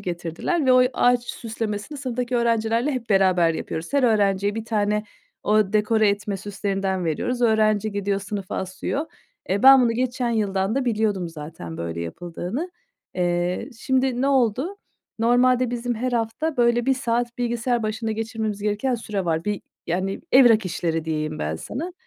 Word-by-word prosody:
getirdiler 175 - -2
ve 255 - +6
o 255 0 +7
ağaç 245 0 +3
süslemesini 225 +4 -5
sınıftaki 250 -2 -2
öğrencilerle 230 +2 +1
hep 235 -4 -5
beraber 185 -4 +4
yapıyoruz. 160 +9 -5
Her 280 - +3
öğrenciye 205 -3 +2
1 225 - -4
tane 210 -1 0 0.4
o 210 -2 +2
dekore 215 0 +3
etme 200 0 -1
süslerinden 195 -2 -2
veriyoruz. 245 +10 -1
Öğrenci 215 -2 +2
gidiyor, 200 0 -1
sınıfa 195 -1 -5
asıyor. 190 - -3 0.4
Eee, 200 +5 0
ben 270 -1 +9
bunu 235 -2 +2
geçen 245 0 -1
yıldan 200 -1 0
da 275 - 0
biliyordum 210 -6 0
zaten 150 - -8
böyle 85 0 -4
yapıldığını. 175 - -5 0.4
Eee, 175 +4 -1
şimdi 260 0 +1
ne 275 - +2
oldu? 265 - +1 0.4
Normalde 245 +1 +3
bizim 240 0 -2
her 250 +2 -2
hafta 240 +7 -1
böyle 240 0 +2
1 270 - +4
saat 240 -1 -2
bilgisayar 240 0 0
başında 220 +1 -2
geçirmemiz 220 -2 -3
gereken 210 +5 0
süre 210 -5 -3
var. 160 -1 -1
Bir 210 -1 -2 0.3
yani 185 +3 -2
evrak 240 -5 +6
işleri 165 -2 -2
diyeyim 155 -1 -2
ben 80 +1 -2
sana. 325 - -5
220 Hz, 155 wpm, -23 LUFS, 190-245 Hz, 0.4 s, ben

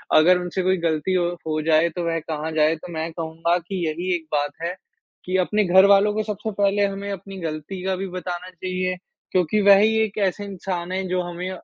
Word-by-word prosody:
अगर 180 +3 +6
उनसे 180 +1 -3
कोई 185 0 +2
गलती 160 +4 0
हो 175 -1 +2 0.2
हो 155 0 0
जाए, 160 +1 +4
तो 170 +1 -4
वह 165 0 0
कहाँ 155 0 -4
जाए। 155 +1 +3
तो 170 +2 -10
मैं 160 +1 -3
कहूँगा 165 +1 -1
कि 185 -4 -2
यही 175 +4 -1
एक 165 -2 -6
बात 145 0 0
है 175 +2 -2 0.5
कि 185 +1 0
अपने 210 -1 +1
घरवालों 200 +3 +6
को 215 0 -1
सबसे 215 +1 -4
पहले 200 0 +3
हमें 200 0 -4
अपनी 195 0 -7
गलती 160 +5 -6
का 190 -1 0
भी 195 +1 -3
बताना 180 +1 -5
चाहिए, 185 0 -3 0.3
क्योंकि 185 +3 +2
वह 200 -1 +8
ही 220 +2 +3
एक 215 -1 -2
ऐसे 205 +3 -4
इंसान 185 -2 -4
हैं, 190 0 -2
जो 185 0 +1
हमें 175 +1 -5
180 Hz, 210 wpm, -23 LUFS, 165-195 Hz, 0.5 s, वह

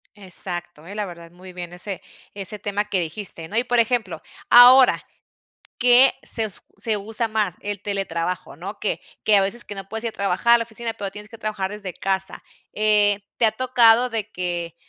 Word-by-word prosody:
Exacto, 175 -4 -2
¿eh? 200 - -9
La 210 -1 -2
verdad 170 -2 -11
muy 185 +1 -13
bien 175 -1 -8
ese 180 +1 -3 0.3
ese 200 +1 -2
tema 205 0 -3
que 195 -3 -1
dijiste, 165 0 -3
¿no? 215 - -3
Y, 240 - +2
por 245 -1 +1
ejemplo, 225 -8 0 0.3
ahora, 250 +2 +7 0.8
¿qué 250 +2 +6
se 225 - -2
s 205 -5 -7 0.2
se 220 -3 0
usa 220 +3 -3
más? 215 -5 -1
El 205 -1 -5
teletrabajo, 185 -5 -4
¿no? 195 +6 -8
Que 210 - -2 0.2
que 215 - +4
a 195 - +4
veces 205 +5 +2
que 205 - -9
no 195 -1 -7
puedes 225 +2 -6
ir - - 0
a - - -24
trabajar 200 +4 +2
a - - +5
la 230 - -3
oficina, 230 0 -2
pero 200 -3 -6
tienes 210 +1 -10
que 230 - -13
trabajar 210 -3 -3
desde 205 -3 -6
casa. 190 0 -2 0.3
Eh, 210 -1 +3 0.2
¿te 230 - +3
ha 215 - +1
tocado 245 0 +3
de 220 -2 -3
que 175 -3 -4
205 Hz, 200 wpm, -22 LUFS, 185-225 Hz, 0.8 s, ahora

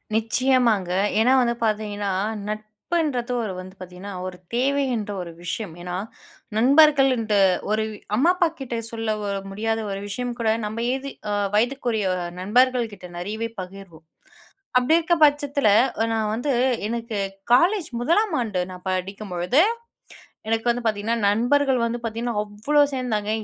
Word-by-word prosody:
நிச்சயமாங்க. 225 -4 +2 0.3
ஏன்னா 250 +4 +4
வந்து 235 -1 +1
பார்த்தீங்கன்னா, 210 -2 -1 0.4
நட்புன்றது 240 +5 -2
ஒரு 200 -4 -3
வந்து 185 +1 -10
பார்த்தீங்கன்னா, 185 +2 -8
ஒரு 180 -1 -7 0.2
தேவை 280 +3 +2
என்ற 210 -2 -3
ஒரு 170 - -7
விஷயம். 175 +1 -4
ஏன்னா, 180 0 -5 0.6
நண்பர்கள் 275 +3 +6
ன்ட்ட 215 -2 0 0.4
ஒரு 215 0 +1 0.3
அம்மா 330 +7 +5
அப்பாகிட்ட 315 -9 -1
சொல்ல 225 -1 -3 0.4
முடியாத 225 +3 -1
ஒரு 195 - -3
விஷயம் 245 +4 -3
கூட 225 -1 +1 0.2
நம்ம 220 +2 -4
ஏதி 270 +1 -4 0.2
அ - - 0 0.2
வயதுக்குரிய 235 -2 +1 0.4
நண்பர்கள் 245 +4 +3
கிட்ட 185 -2 -11
நெறையவே 215 +6 -3
பகிர்வோம். 180 -3 -10 0.7
அப்டி 250 +5 +3
இருக்கிற 340 +1 +2
பட்சத்தில 285 -3 +2 0.4
நான் 220 -1 0
வந்து 245 +6 -1 0.4
எனக்கு 230 -1 -3 0.3
காலேஜ் 350 +7 +4
1ஆம் 340 - +2
ஆண்டு 210 -6 -1
நான் 180 0 -10
படிக்கும்பொழுது, 185 - 0 0.9
எனக்கு 225 +1 0
வந்து 245 +1 -1
பார்த்தீங்கன்னா, 220 +1 0
நண்பர்கள் 255 +5 +2
வந்து 235 +1 -1
பார்த்தீங்கன்னா, 230 +1 -3
அவ்ளோ 215 +9 +1
சேர்ந்தாங்க. 220 -5 -1
225 Hz, 130 wpm, -23 LUFS, 205-260 Hz, 0.9 s, நண்பர்கள்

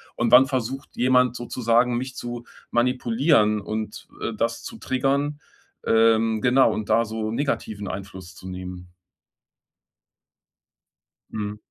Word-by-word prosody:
Und 120 -1 0
wann 125 +2 +9
versucht 130 +1 -3
jemand 125 0 +3
sozusagen, 120 0 +1
mich 130 +1 -5
zu 120 -1 -6 0.3
manipulieren 120 -2 +2
und, 110 +1 -5
äh, 115 - -2
das 115 +2 -2
zu 230 - -8
triggern?“ 140 - -1 0.5
Ähm, 115 -1 +3
genau, 125 +3 +4
und 110 - -4
da 115 - +3
so 110 0 -4
negativen 110 -6 -2
Einfluss 95 -2 -8
zu 95 - -11
nehmen. 90 -1 -8 2.4
Mhm. 105 -1 -4
115 Hz, 120 wpm, -24 LUFS, 105-125 Hz, 2.4 s, wann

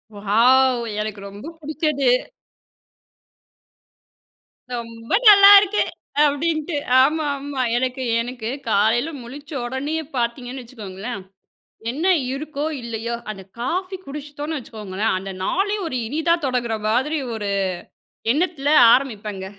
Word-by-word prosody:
Wow! 240 +5 +3 0.2
எனக்கு 215 -1 -5
ரொம்ப 205 +8 -10
பிடிச்சது. 305 -2 -1 2.7
"ரொம்ப 230 -1 -8 0.2
நல்லாயிருக்கு." 400 0 +8 0.4
அப்படின்ட்டு. 310 +2 -1 0.3
ஆமாமா. 285 -2 -1 0.2
எனக்கு 255 +1 -2 0.2
எனக்கு 240 -2 -5 0.2
காலையில 225 +8 +2
முழிச்ச 285 +5 -11
உடனேயே 285 +6 -3
பார்த்தீங்கன்னு 245 +2 -3
வச்சுக்கோங்களேன், 215 -2 -7 0.7
என்ன 310 +8 -2 0.3
இருக்கோ, 295 0 -4 0.2
இல்லையோ? 235 0 -4 0.2
அந்த 195 -2 -10 0.2
காஃபி 370 +9 -2
குடிச்சிட்டோன்னு 295 +2 -5
வச்சுக்கோங்களேன். 215 -4 -3
அந்த 195 +1 -7
நாளே 405 - 0
ஒரு 255 -6 -2
இனிதா 320 +5 +1
தொடங்கிற 240 -3 -1
மாதிரி 265 +8 +1 0.2
ஒரு 205 -2 -4 0.8
எண்ணத்தில 300 -2 0 0.2
ஆரம்பிப்பேங்க. 210 -7 -1
260 Hz, 95 wpm, -22 LUFS, 230-305 Hz, 2.7 s, நல்லாயிருக்கு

